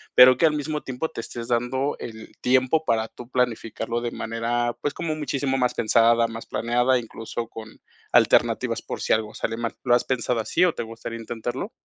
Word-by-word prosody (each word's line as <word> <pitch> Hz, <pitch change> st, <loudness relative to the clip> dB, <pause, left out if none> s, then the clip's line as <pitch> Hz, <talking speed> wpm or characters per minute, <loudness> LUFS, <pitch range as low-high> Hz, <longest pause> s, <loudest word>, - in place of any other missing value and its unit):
pero 130 Hz, 0 st, +9 dB
que 165 Hz, -, +4 dB
al 155 Hz, -, +1 dB
mismo 150 Hz, +1 st, -2 dB
tiempo 130 Hz, +5 st, -4 dB
te 140 Hz, -, -6 dB
estés 115 Hz, 0 st, -7 dB
dando 125 Hz, +4 st, 0 dB
el 110 Hz, -2 st, -8 dB
tiempo 130 Hz, +5 st, +3 dB
para 110 Hz, -3 st, +1 dB
tú 120 Hz, +1 st, -12 dB
planificarlo 120 Hz, -2 st, -1 dB
de 120 Hz, -, -2 dB
manera, 120 Hz, +1 st, -1 dB
pues, 145 Hz, -, -1 dB
como 160 Hz, -2 st, -2 dB
muchísimo 140 Hz, -3 st, -1 dB
más 125 Hz, -1 st, +2 dB
pensada, 115 Hz, +1 st, +4 dB
más 115 Hz, 0 st, -7 dB
planeada, 120 Hz, +3 st, +2 dB
incluso 115 Hz, 0 st, -6 dB
con 110 Hz, -1 st, -11 dB, 0.3 s
alternativas -, -, +3 dB
por -, -, -6 dB
si -, -, +2 dB
algo 110 Hz, -1 st, -1 dB
sale 115 Hz, 0 st, -2 dB
mal, 115 Hz, -1 st, -3 dB
¿lo 120 Hz, -, +3 dB
has 120 Hz, -, +2 dB
pensado 125 Hz, -2 st, 0 dB
así 115 Hz, +10 st, +2 dB
o 175 Hz, -, +2 dB
te -, -, -4 dB
gustaría 115 Hz, 0 st, -7 dB
intentarlo? 120 Hz, -, -4 dB
120 Hz, 195 wpm, -24 LUFS, 115-130 Hz, 0.3 s, pero